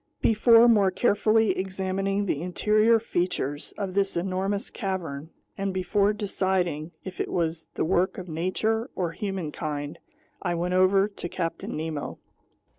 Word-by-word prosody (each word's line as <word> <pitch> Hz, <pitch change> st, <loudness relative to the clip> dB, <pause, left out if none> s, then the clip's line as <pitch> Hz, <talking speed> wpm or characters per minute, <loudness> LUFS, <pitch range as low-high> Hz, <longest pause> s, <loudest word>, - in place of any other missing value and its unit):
Before 230 Hz, +1 st, +6 dB
more 205 Hz, -5 st, +5 dB
carefully 215 Hz, +2 st, +3 dB
examining 190 Hz, +1 st, -1 dB
the 150 Hz, -6 st, -1 dB
interior 215 Hz, +6 st, +3 dB
features 175 Hz, -8 st, -2 dB
of 195 Hz, -3 st, -3 dB
this 195 Hz, -2 st, +1 dB
enormous 195 Hz, +3 st, -1 dB
cavern, 165 Hz, -7 st, -4 dB, 0.3 s
and 195 Hz, 0 st, 0 dB
before 200 Hz, +2 st, +2 dB
deciding 190 Hz, -6 st, -1 dB
if 185 Hz, -1 st, -5 dB
it -, -, -3 dB
was 165 Hz, -1 st, -1 dB
the -, -, 0 dB
work 185 Hz, +2 st, +1 dB
of 185 Hz, -, -6 dB
nature 215 Hz, -, -1 dB
or 175 Hz, -3 st, -1 dB
humankind, 155 Hz, -6 st, -4 dB, 0.4 s
I 175 Hz, -2 st, -1 dB
went 175 Hz, +2 st, -1 dB
over 190 Hz, +2 st, +4 dB
to 200 Hz, -4 st, -7 dB
Captain 165 Hz, -3 st, -3 dB
Nemo. 155 Hz, -2 st, -4 dB
190 Hz, 135 wpm, -26 LUFS, 170-200 Hz, 0.4 s, Before